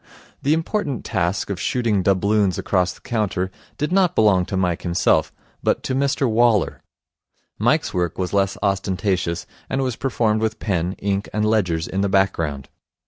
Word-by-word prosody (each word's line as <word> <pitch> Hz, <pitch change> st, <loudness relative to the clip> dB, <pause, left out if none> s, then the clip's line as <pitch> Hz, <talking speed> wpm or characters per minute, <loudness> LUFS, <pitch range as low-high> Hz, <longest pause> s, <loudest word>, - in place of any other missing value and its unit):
The 145 Hz, +3 st, +3 dB
important 165 Hz, -, -2 dB
task 95 Hz, -1 st, -1 dB
of 95 Hz, -, -4 dB
shooting 115 Hz, -6 st, +1 dB
doubloons 100 Hz, 0 st, +2 dB
across 90 Hz, -2 st, +1 dB
the -, -, -15 dB
counter 100 Hz, -5 st, -1 dB, 0.3 s
did 150 Hz, +3 st, -2 dB
not 185 Hz, -2 st, +3 dB
belong 95 Hz, -5 st, +4 dB
to 95 Hz, -, -2 dB
Mike 90 Hz, -2 st, 0 dB
himself, 85 Hz, 0 st, +2 dB, 0.3 s
but -, -, 0 dB
to -, -, -2 dB
Mr 140 Hz, 0 st, +1 dB
Waller. 115 Hz, -3 st, +2 dB, 0.8 s
Mike's -, -, +2 dB
work 90 Hz, -2 st, -1 dB
was 90 Hz, 0 st, -2 dB
less 100 Hz, -1 st, +1 dB
ostentatious, 95 Hz, -3 st, 0 dB, 0.2 s
and 135 Hz, 0 st, 0 dB
was 130 Hz, -3 st, -1 dB
performed 115 Hz, -5 st, 0 dB
with 110 Hz, 0 st, -1 dB
pen, 90 Hz, -4 st, -1 dB
ink, 100 Hz, 0 st, -2 dB
and 105 Hz, 0 st, 0 dB
ledgers 90 Hz, -7 st, +1 dB
in 95 Hz, -, -2 dB
the 100 Hz, -, +1 dB
background. 80 Hz, -8 st, 0 dB
100 Hz, 160 wpm, -22 LUFS, 90-115 Hz, 0.8 s, belong